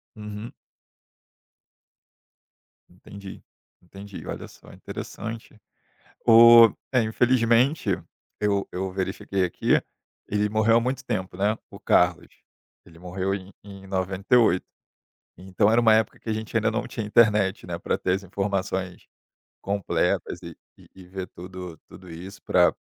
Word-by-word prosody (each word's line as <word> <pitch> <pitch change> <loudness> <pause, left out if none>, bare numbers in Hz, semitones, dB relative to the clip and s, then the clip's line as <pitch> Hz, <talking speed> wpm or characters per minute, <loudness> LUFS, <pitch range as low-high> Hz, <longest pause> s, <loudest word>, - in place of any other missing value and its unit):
Uhum. 105 +1 -8 2.4
Entendi, 95 +2 -12 0.4
entendi. 100 +2 -11
Olha - - -6
só, - - -17
interessante. 110 0 -8 0.7
O 115 0 +9 0.2
é, 130 -2 +4
infelizmente, 120 +4 +2 0.5
eu 100 -1 +1
eu 95 +1 -3
verifiquei 95 0 -2
aqui, 85 - +1 0.5
ele 105 +1 0
morreu 110 +2 +3
há - - +1
muito 130 +2 -3
tempo, 95 -7 -3
né, 105 +3 +1
o - - -11
Carlos. - - +2 0.6
Ele 85 -1 -16
morreu 95 +2 -3
em 95 0 -8
em 100 -1 -12
98. 95 +2 +2 0.7
Então 95 +3 +1
era 120 +1 +4
uma 110 -1 +5
época 110 0 +1
que - - -8
a 110 - +1
gente 110 +1 -6
ainda 110 0 +2
não 110 - -2
tinha 110 - -5
internet, 105 -3 +3
né, 85 -1 -4
para 85 - -2
ter 90 - 0
as 95 +1 -2
informações 95 -1 -3 0.6
completas 100 -1 -1
e 85 -1 -9 0.2
e - - -19
e 95 - -13
ver 95 0 -6
tudo 90 -2 -9
tudo 90 -2 -13
isso 90 +5 -10
para - - +3
100 Hz, 135 wpm, -25 LUFS, 95-110 Hz, 2.4 s, O